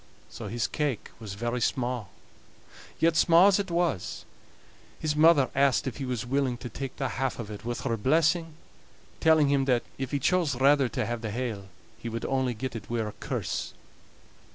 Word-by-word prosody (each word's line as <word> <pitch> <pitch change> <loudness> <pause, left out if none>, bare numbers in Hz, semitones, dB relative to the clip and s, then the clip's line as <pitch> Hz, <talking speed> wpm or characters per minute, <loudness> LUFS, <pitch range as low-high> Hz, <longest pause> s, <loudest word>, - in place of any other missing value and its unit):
So - - -7
his 120 0 -1
cake 145 -8 -2
was 105 -4 -7
very 120 +3 -2
sma'; 120 -2 -1 0.9
yet 165 0 +3
sma' 165 +3 +6
as 200 - +3
it 195 -2 -2
was, 170 - -1 0.7
his 150 -1 -1
mother 155 -3 +5
asked 135 -1 +3
if 130 - -4
he 140 - -4
was 125 -2 -3
willing 130 -1 0
to 125 - -7
take 135 +3 -6
the 135 - -2
half 130 +1 -2
of 110 -3 -6
it 105 - -8
with 120 +1 -3
her 115 -3 -1
blessing, 160 - +2 0.6
telling 155 -3 +4
him 140 -1 +2
that, 125 -3 +2 0.2
if 135 -2 -2
he 145 - 0
chose 165 0 +1
rather 140 -1 +4
to - - -2
have 120 -1 -3
the 110 - -3
hale, 110 -4 -4 0.3
he 115 - -5
would 115 0 -4
only 130 -2 0
get 130 +2 -5
it 115 - -7
wi' 120 - -1
her 110 -2 -2
curse. - - -3
130 Hz, 190 wpm, -28 LUFS, 120-150 Hz, 0.9 s, sma